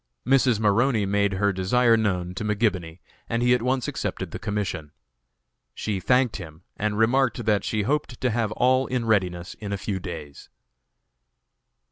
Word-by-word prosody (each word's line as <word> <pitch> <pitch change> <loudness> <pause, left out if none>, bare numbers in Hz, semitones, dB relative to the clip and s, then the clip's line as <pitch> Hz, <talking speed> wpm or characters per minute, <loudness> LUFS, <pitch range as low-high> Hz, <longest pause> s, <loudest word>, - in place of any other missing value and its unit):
Mrs. 130 -3 +3
Maroney 110 +1 +2
made 100 0 +1
her 100 +1 +1
desire 115 +6 +3
known 90 -5 -1
to 95 - -5
McGibony, 100 -6 -1 0.3
and 115 +1 0
he 125 0 +5
at 125 - +2
once 130 0 0
accepted - - -4
the - - -6
commission. 100 -8 -3 0.8
She 105 -3 -2
thanked 125 +3 +2
him, 80 -3 -10
and 105 0 -2
remarked 120 +1 +2
that 105 -2 +2
she 105 -2 -1
hoped 135 0 -1
to 125 - 0
have 110 -1 0
all 130 +3 +2
in 125 -2 -1
readiness 90 -5 0
in 105 -2 -7
a 100 - -1
few 95 0 -3
days. 80 -6 -8
105 Hz, 160 wpm, -25 LUFS, 95-120 Hz, 0.8 s, he